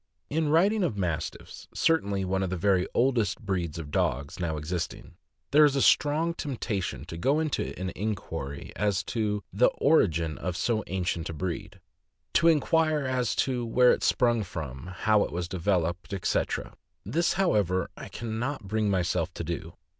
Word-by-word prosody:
writing 165 +7 +3
of 120 - -1
Mastiffs, 90 -5 -4
certainly 100 -12 +1
one 95 +1 0
of 95 - -1
the 95 - -2
very 95 0 +2
oldest 120 -6 +2
breeds 90 -7 -2
of 75 -3 -7
dogs 70 +5 -1
now 85 -3 -1
existing, 80 +3 -4 0.4
there 150 +2 +7
is 145 -2 +4
a - - +2
strong 155 +4 +3
tempta 125 - -3
tion 65 -5 -5
to 80 - -7
go 135 - +2
into 155 -10 -2
an 95 0 -3
inquiry 80 -9 -4
as 100 -2 0
to 105 -3 -1
the - - +5
origin 85 - +2
of 90 0 -3
so 110 +2 0
ancient 90 -3 -2
a - - -4
breed; 90 +3 -5 0.5
to 170 - +4
inquire 155 -1 +3
as 125 -6 0
to 125 -2 0
where 125 +2 +5
it - - +1
sprung 120 -3 +3
from, 75 -8 -6
how 105 +3 +2
it - - -4
was 85 0 -3
developed, 85 -1 -1
etc. 95 - -1 0.3
This, 170 +2 +1
however, 105 - +1
I - - -8
can 110 -1 -5
not 135 0 -3
bring 105 +1 0
myself 90 -2 0
to - - -4
do. 80 0 -5
100 Hz, 170 wpm, -28 LUFS, 85-130 Hz, 0.5 s, there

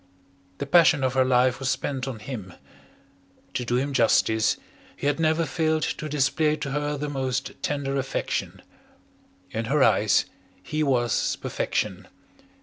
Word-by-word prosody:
The 140 - -3
passion 160 -2 +5
of 130 -1 +1
her 130 -1 +4
life 125 0 +3
was 135 -1 -1
spent 135 -2 -2
on 130 -4 -4
him. 105 -5 -7 1.0
To 125 - -2
do 120 0 -1
him 140 +3 0
justice, 110 -3 +3 0.4
he - - -6
had 145 +2 +1
never 160 +1 +2
failed 160 -2 0
to 155 - -3
display 150 +2 +2
to 140 -2 -5
her 150 +1 -1
the 150 +1 -3
most 135 -2 -2
tender 140 -2 -2
affection. 135 0 -3 0.9
In 115 +1 -2
her 140 +3 +3
eyes - - +4 0.4
he 155 - -2
was 125 -5 +1
perfection. - - -3
135 Hz, 145 wpm, -25 LUFS, 125-150 Hz, 1.0 s, passion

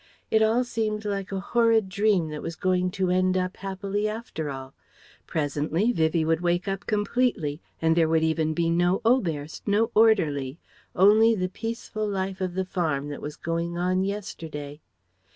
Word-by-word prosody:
It 220 - +4
all 225 +3 +3
seemed 215 -3 -2
like 200 -2 -3
a 195 - -2
horrid 225 0 +2
dream 195 -3 +1
that 150 -1 -6
was 165 - -5
going 185 +1 +1
to 185 0 -1
end 185 0 +2
up 185 0 -2
happily 195 +2 -2
after 210 -9 -5
all. 135 -1 -7 0.5
Presently 155 - 0
Vivie 160 -5 +1
would 165 +1 +1
wake 175 +2 0
up 195 0 -3
completely 205 - 0 0.2
and 160 0 +2
there 165 -2 +3
would 160 0 +2
even 160 -1 +1
be 165 -1 +1
no 175 +2 +2
Oberst, 165 - 0
no 220 +3 +2
orderly; 160 -11 +3 0.4
only 215 +4 +6
the 185 -2 -1
peaceful 225 +1 -4
life 190 -1 -3
of 180 -1 -2
the 190 0 -1
farm 155 -6 -1
that 145 - -6
was 150 0 -6
going 170 +1 -3
on 185 +1 +1
yesterday. 160 -7 -5
185 Hz, 170 wpm, -26 LUFS, 160-210 Hz, 0.5 s, only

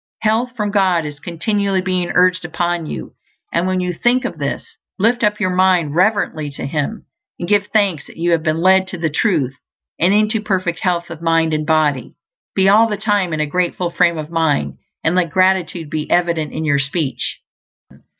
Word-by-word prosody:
Health 230 +4 +1
from 210 -3 -2
God 185 -5 +2
is 145 -1 -7
continually 195 +4 -1
being 185 -1 -1
urged 185 0 +3
upon 175 -1 -2
you; - - -7 0.4
and 170 +2 +1
when 185 0 0
you 180 0 -2
think 245 +7 +1
of 170 -10 -5
this, 140 -1 -4 0.2
lift 235 +5 +1
up 210 0 +1
your 185 -3 0
mind 180 -5 +2
reverently 185 -5 +1
to - - -5
Him, 150 +9 -3 0.3
and 175 - -5
give 205 +1 +2
thanks 200 -9 0
that - - -15
you 170 +1 0
have 165 -2 +2
been 160 0 -1
led 190 +1 +4
to 185 - -6
the 160 -2 -1
Truth 150 - 0 0.4
and 175 +3 +3
into 215 +1 +2
perfect 185 -5 -1
health 175 -2 -1
of 165 -1 -8
mind 165 -1 +2
and 155 0 -1
body. 155 -5 +1 0.4
Be, 190 0 +3
all 215 +3 +6
the 210 - -2
time, 205 -4 0
in 155 -1 -1
a - - +1
grateful 175 +2 -1
frame 170 -1 +2
of 155 +1 -6
mind, 160 -3 0 0.2
and 165 - +2
let 180 -2 +1
gratitude 185 -1 +1
be 155 -1 -3
evident 170 -3 +1
in 160 - -4
your 145 -2 +2
speech. 140 -3 -2
175 Hz, 195 wpm, -18 LUFS, 160-195 Hz, 0.4 s, all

